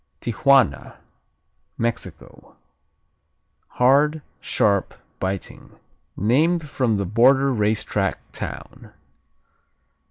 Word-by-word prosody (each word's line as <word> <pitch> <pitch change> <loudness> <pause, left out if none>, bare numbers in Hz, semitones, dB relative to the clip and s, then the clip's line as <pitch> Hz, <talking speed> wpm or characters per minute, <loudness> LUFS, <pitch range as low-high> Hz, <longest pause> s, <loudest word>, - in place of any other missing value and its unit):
Tijuana 120 - +2 0.8
Mexico 115 0 -6 1.2
Hard; 145 +4 +3 0.2
sharp; 100 -2 0 0.2
biting; 95 0 -6 0.4
named 150 - +1
from 125 -6 0
the 100 - -2
border 130 +7 +3
race 110 -1 0
track 95 -2 -2
town. - - -9
120 Hz, 70 wpm, -22 LUFS, 105-140 Hz, 1.2 s, Hard